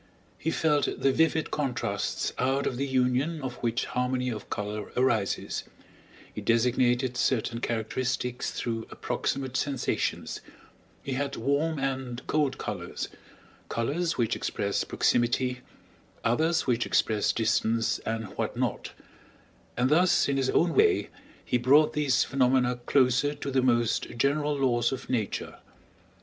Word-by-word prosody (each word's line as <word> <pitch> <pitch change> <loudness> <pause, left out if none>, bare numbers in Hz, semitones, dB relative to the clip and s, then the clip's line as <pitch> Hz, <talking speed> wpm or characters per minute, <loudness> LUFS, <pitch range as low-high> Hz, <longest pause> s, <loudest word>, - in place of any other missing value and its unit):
He 160 - -1
felt 150 -3 +2
the 135 - +3
vivid 160 +2 +1
contrasts 135 -5 -2
out 135 +2 +1
of 125 - -1
the 140 +2 -1
union 130 +5 +1
of 125 -2 -4
which 120 0 -1
harmony 125 0 -1
of 105 -3 -7
color 105 0 -4
arises, 115 -6 0 0.7
he - - -5
designated 125 +1 +2
certain 120 -1 0
characteristics 125 +2 -2
through 115 -1 -3
approximate 130 -2 -3
sensations, 135 -2 -1 0.6
he 140 - -5
had 140 +1 -2
warm 145 +6 0
and 130 -3 -3
cold 150 -3 +1
colors, 90 -5 -5 0.6
colors 155 +9 -1
which 115 -3 +1
express 100 -1 -1
proximity, 125 +1 +1 0.6
others 160 +8 +2
which 120 -2 +1
express 110 -2 +2
distance, 115 0 +1
and 110 0 -3
what - - -2
not; - - -2 0.8
and 125 +3 +2
thus 175 +4 +4
in 140 - 0
his 130 -1 +1
own 170 0 +2
way 425 -2 +3 0.3
he 125 - +1
brought 140 +5 +5
these 145 -4 +2
phenomena 125 -2 +2
closer 135 +2 +3
to 140 - -5
the 130 0 +2
most 120 -3 +2
general 145 +4 +1
laws 120 -3 +2
of 130 -1 -5
Nature. 110 -5 -2
125 Hz, 130 wpm, -28 LUFS, 120-140 Hz, 0.8 s, brought